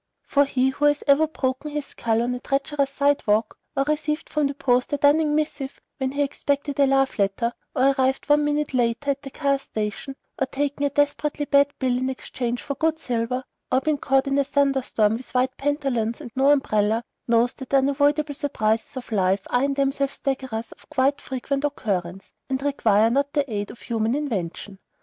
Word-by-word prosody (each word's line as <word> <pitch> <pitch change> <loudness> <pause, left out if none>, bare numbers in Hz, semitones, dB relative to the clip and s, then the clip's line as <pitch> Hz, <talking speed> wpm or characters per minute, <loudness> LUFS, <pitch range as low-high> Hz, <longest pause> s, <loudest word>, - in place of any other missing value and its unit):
For 285 0 +3
he 265 -1 +1
who 290 +2 -1
has 290 0 +3
ever 290 +2 +5
broken 265 -1 -2
his 295 -1 -3
skull 230 -3 -1
on 245 +1 -1
a 250 - -4
treacherous 275 +1 0
sidewalk, 275 -7 +1 0.2
or 275 - +4
received 300 +1 -2
from 300 -2 +2
the 280 - -5
post 250 -2 +1
a 290 - +1
dunning 295 +1 +3
missive 295 -3 -2 0.2
when 265 0 -1
he 285 0 +1
expected 285 0 -2
a 280 - +5
love 270 -3 +2
letter, 200 +4 +1 0.2
or 265 +2 +4
arrived 265 0 0
one 295 0 +4
minute 295 -1 0
late 240 +2 0
at 280 0 0
the 275 - -8
car 275 0 0
station, 220 +2 -4 0.2
or 270 - +1
taken 285 +1 -1
a - - -2
desperately 290 +1 0
bad 285 0 +4
bill 255 -2 +1
in 255 +1 -1
exchange 245 -2 -4
for 280 - -3
good 320 +3 0
silver, 250 -2 -2 0.3
or 255 - +4
been 305 -1 0
caught 270 0 +2
in 275 0 +1
a - - +4
thunderstorm 270 -6 +1
with 255 +1 -12
white 255 +1 +2
pantaloons 270 -6 -1
and 240 - -9
no 270 +2 +4
umbrella, 220 -5 +2 0.2
knows 235 +2 +3
that 265 -2 -10
the 275 - +4
unavoidable 285 +2 +2
surprises 230 -6 -1
of 245 -2 -7
life 190 -1 +1
are 245 +2 +3
in 280 0 -1
themselves 275 0 0
staggerers 260 -5 -3
of - - -17
quite 280 -1 +1
frequent 275 +2 -3
occurrence, 195 -10 -3 0.2
and 265 0 -2
require 225 -6 +3
not 280 +3 +1
the 285 -1 +1
aid 205 0 -2
of - - -11
human 225 +1 -1
invention. 200 - -4
270 Hz, 195 wpm, -24 LUFS, 240-285 Hz, 0.3 s, ever